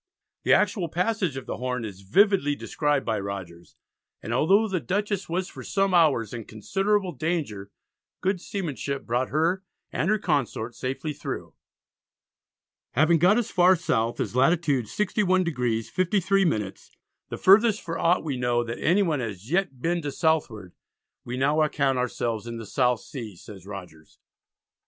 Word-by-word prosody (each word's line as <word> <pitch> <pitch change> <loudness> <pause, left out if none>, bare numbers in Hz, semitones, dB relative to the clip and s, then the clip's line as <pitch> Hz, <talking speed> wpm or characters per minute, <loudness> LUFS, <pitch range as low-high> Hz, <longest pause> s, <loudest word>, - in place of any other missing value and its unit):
The - - +1
actual 190 -4 +2
passage 180 - -1
of 135 - -6
the - - -4
Horn 125 -2 -3
is 100 -3 -8
vividly 145 - +3
described 145 -1 -1
by 110 -2 0
Rogers, 95 -4 -7 0.4
and 115 - -5
although 195 - +4
the 190 -3 -1
Dutchess 200 +3 -2
was 180 +2 -1
for - - -10
some 195 -1 0
hours 145 - +3
in 115 -3 -6
considerable 195 - 0
danger, 155 - -3 0.5
good 185 -1 -1
seamanship 145 -8 -4
brought 125 +2 0
her 165 +6 +1 0.3
and 170 - 0
her 215 - +3
consort 140 - -1
safely 135 +5 -4
through. 145 - -6 1.4
Having 160 +5 +4
got 185 +7 +5
as 240 - -1
far 180 +1 +5
south 120 -9 -1
as - - -2
latitude 140 -2 +2
61°53´, 180 - 0 0.4
"the - - -5
furthest 210 +3 +5
for 165 0 -5
aught 175 +2 +3
we 145 -5 -2
know 120 -1 +1
that 115 0 -5
anyone 170 -4 +2
as 110 +1 -6
yet 195 +3 +3
has 135 - -31
been 170 +7 -1
to 145 -2 -3
Southward, 135 - -1 0.5
we 125 +1 -5
now 145 +4 +2
account 140 -4 +1
ourselves 115 -2 -2
in 115 0 -5
the 115 - -7
South 125 +1 +1
Sea," 115 -8 -8
says 95 +1 -12
Rogers. 90 -6 -10
145 Hz, 150 wpm, -26 LUFS, 115-185 Hz, 1.4 s, got